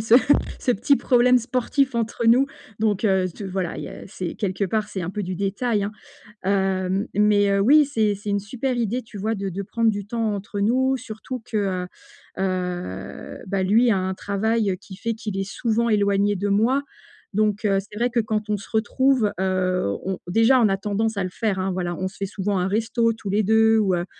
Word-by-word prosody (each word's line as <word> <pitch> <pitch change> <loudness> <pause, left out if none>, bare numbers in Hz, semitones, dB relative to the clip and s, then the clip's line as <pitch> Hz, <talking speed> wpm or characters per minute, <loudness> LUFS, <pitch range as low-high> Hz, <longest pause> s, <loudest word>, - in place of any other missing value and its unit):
ce 220 +1 +4 0.4
ce 250 - +1
petit 265 +7 +3
problème 250 0 +4
sportif 255 +2 0
entre 230 0 -1
nous, 250 +4 +5 0.3
donc 215 -1 +1
heu, 190 -3 +3
ce 200 - -8
voilà, 185 -2 -3
il - - -5
y - - -7
a - - -9
c'est 180 -3 -5
quelque 200 0 -2
part, 210 +2 -1
c'est 190 -3 -4
un 175 - -3
peu 210 +1 -4
du 185 -1 -4
détail, 200 +2 0
hein. 205 - -4 0.5
Hem, 190 +1 0
mais 205 0 +4
heu, 200 - +2
oui, 285 +8 +6
c'est 220 -7 +1
c'est 205 +1 -6
une 200 - +1
super 245 +6 -3
idée, 240 +2 -1
tu 220 -2 -11
vois? 220 +3 -1
De 200 -1 -3
de 195 +2 -4
prendre 230 +3 +1
du 205 -2 -5
temps 225 -1 -1
entre 200 0 -4
nous, 260 +5 +2
surtout 245 +1 -7
que, 225 - -4
heu, 185 -3 -1 0.5
heu, 180 - -4
bah, 195 -1 0
lui 225 +6 +4
a 195 - +3
un 185 0 -2
travail 205 0 0
qui 195 - -11
fait 230 +4 -3
qu'il 215 -3 -5
est 195 0 -3
souvent 235 0 0
éloigné 205 -1 +2
de 200 +2 -2
moi 235 +8 +2 0.5
donc 210 0 +1
heu, 195 -1 +3
c'est 205 +2 -7
vrai 240 +1 +2
que 235 -1 +1
quand 215 -1 -2
on 210 - +1
se 200 - -10
retrouve, 240 0 +2
heu, 185 - 0
on 190 -1 -2
déjà, 225 +7 +4
on 215 - +5
a 195 - 0
tendance 210 +2 -1
à 185 - 0
le - - -2
faire 190 -1 -1
voilà 175 -1 -2
on 185 +1 -3
se 190 - -16
fait 200 - -3
souvent 195 0 -2
un 180 - 0
resto 230 +3 +1
tous 215 -2 -8
les 205 +2 +2
2 220 +2 +4
ou 195 -4 +2
heu, 175 0 -1
205 Hz, 220 wpm, -23 LUFS, 190-225 Hz, 0.5 s, oui